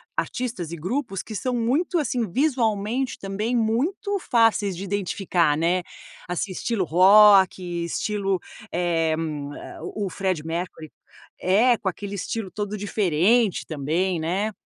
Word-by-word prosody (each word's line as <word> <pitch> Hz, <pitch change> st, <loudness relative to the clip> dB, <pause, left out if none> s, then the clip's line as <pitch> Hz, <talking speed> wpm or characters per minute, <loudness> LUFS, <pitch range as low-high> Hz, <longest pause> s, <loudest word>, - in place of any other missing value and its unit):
artistas 225 Hz, -10 st, -3 dB
e -, -, -4 dB
grupos 195 Hz, -, -3 dB
que 220 Hz, -, -9 dB
são 250 Hz, +4 st, -2 dB
muito 280 Hz, +10 st, +1 dB
assim, 245 Hz, -, -1 dB
visualmente 245 Hz, -, 0 dB
também 210 Hz, +5 st, -2 dB
muito 315 Hz, -, 0 dB
fáceis 225 Hz, -, +2 dB
de 195 Hz, -, -5 dB
identificar, 185 Hz, -5 st, 0 dB
né? 175 Hz, +3 st, +1 dB, 0.5 s
Assim, 185 Hz, +2 st, -2 dB
estilo 205 Hz, +1 st, -1 dB
rock, 190 Hz, +1 st, +6 dB, 0.2 s
estilo, 195 Hz, +1 st, -1 dB, 0.3 s
eh, 165 Hz, -2 st, +1 dB, 0.7 s
o 200 Hz, +4 st, -4 dB
o -, -, -3 dB
Freddie 185 Hz, -6 st, -1 dB
Mercury. 165 Hz, -2 st, -5 dB, 0.5 s
É, 225 Hz, +7 st, +4 dB
com 190 Hz, -, -1 dB
aquele 200 Hz, +2 st, -7 dB
estilo 200 Hz, 0 st, -4 dB
todo 210 Hz, 0 st, -4 dB
diferente 205 Hz, +2 st, +2 dB
também, 165 Hz, +4 st, -1 dB
né. 195 Hz, +7 st, -1 dB
200 Hz, 125 wpm, -24 LUFS, 180-230 Hz, 0.7 s, rock